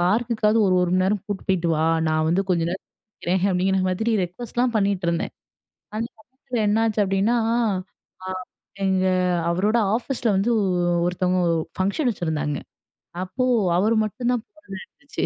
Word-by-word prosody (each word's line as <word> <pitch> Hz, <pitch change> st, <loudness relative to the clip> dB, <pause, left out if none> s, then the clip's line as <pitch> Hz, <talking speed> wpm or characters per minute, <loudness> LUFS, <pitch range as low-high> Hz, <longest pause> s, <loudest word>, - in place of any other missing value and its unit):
பார்க்கக்காது 220 Hz, +3 st, +2 dB
ஒரு 185 Hz, -, +3 dB
ஒரு 175 Hz, -, 0 dB
மணி 185 Hz, 0 st, +3 dB
நேரம் 200 Hz, 0 st, 0 dB
கூட்டு 205 Hz, -2 st, -3 dB
போயிட்டு 175 Hz, -3 st, +1 dB
வா. 155 Hz, -, +1 dB, 0.2 s
நான் 155 Hz, 0 st, +1 dB
வந்து 175 Hz, +4 st, +2 dB
கொஞ்ச 170 Hz, -2 st, +2 dB
நே -, -, -1 dB, 0.5 s
இருக்கறேன் 180 Hz, +1 st, 0 dB
அப்டிங்கிற 190 Hz, +1 st, +1 dB
மாதிரி 220 Hz, +6 st, -1 dB
ரெக்வெஸ்ட்லாம் 240 Hz, +6 st, -2 dB
பண்ணீட்டுருந்தேன். 190 Hz, -5 st, 0 dB, 0.6 s
அந்த 225 Hz, +2 st, -1 dB
சமயத்தில 250 Hz, +1 st, -6 dB
என்னாச்சு 220 Hz, 0 st, +2 dB
அப்டின்னா, 195 Hz, +5 st, +1 dB, 0.9 s
அ -, -, -4 dB, 0.6 s
எங்க 190 Hz, -1 st, +2 dB, 0.4 s
அவரோட 200 Hz, +6 st, +1 dB, 0.2 s
ஆஃபீஸில 250 Hz, 0 st, -2 dB
வந்து 200 Hz, +5 st, +1 dB, 0.6 s
ஒருத்தவங்க 180 Hz, +1 st, +1 dB
ஓ -, -, +1 dB, 0.2 s
ஃபங்ஷன் 200 Hz, +9 st, +1 dB
வெச்சிருந்தாங்க. 155 Hz, -7 st, -2 dB, 0.7 s
அப்போ 210 Hz, +8 st, -2 dB, 0.3 s
அவர் 220 Hz, +4 st, +2 dB
மட்டும் 240 Hz, +4 st, -2 dB
தான் 240 Hz, -2 st, -1 dB
போறதா 200 Hz, -12 st, -11 dB
இருந்துச்சு. 280 Hz, 0 st, -6 dB
195 Hz, 140 wpm, -23 LUFS, 180-230 Hz, 0.9 s, ஒரு